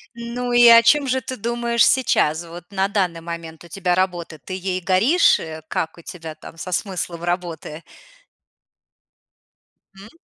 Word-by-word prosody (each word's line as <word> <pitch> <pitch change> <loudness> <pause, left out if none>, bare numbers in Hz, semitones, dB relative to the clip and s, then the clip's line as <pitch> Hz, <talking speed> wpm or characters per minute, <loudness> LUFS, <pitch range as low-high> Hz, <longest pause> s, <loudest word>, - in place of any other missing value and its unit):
Ну, 240 +1 -4
и 240 0 +7
о 230 0 +9
чём 285 +2 +4
же 260 +1 0
ты 255 +2 -6
думаешь 235 +1 +1
сейчас? 170 - +2
Вот 170 +1 -10
на 195 0 0
данный 180 -5 -1
момент 165 -1 -8
у - - -13
тебя 180 0 -1
работа: 175 -4 -2
ты 160 +8 -8
ей 185 0 -3
горишь? 215 - +3
Э, 160 -1 -7
как 160 - -3
у - - -12
тебя 160 -2 -9
там 165 - -13
со 185 +2 -7
смыслом 175 -3 -3
работы? 170 -3 -4 2.2
М. 205 +3 -12
185 Hz, 160 wpm, -21 LUFS, 170-235 Hz, 2.2 s, о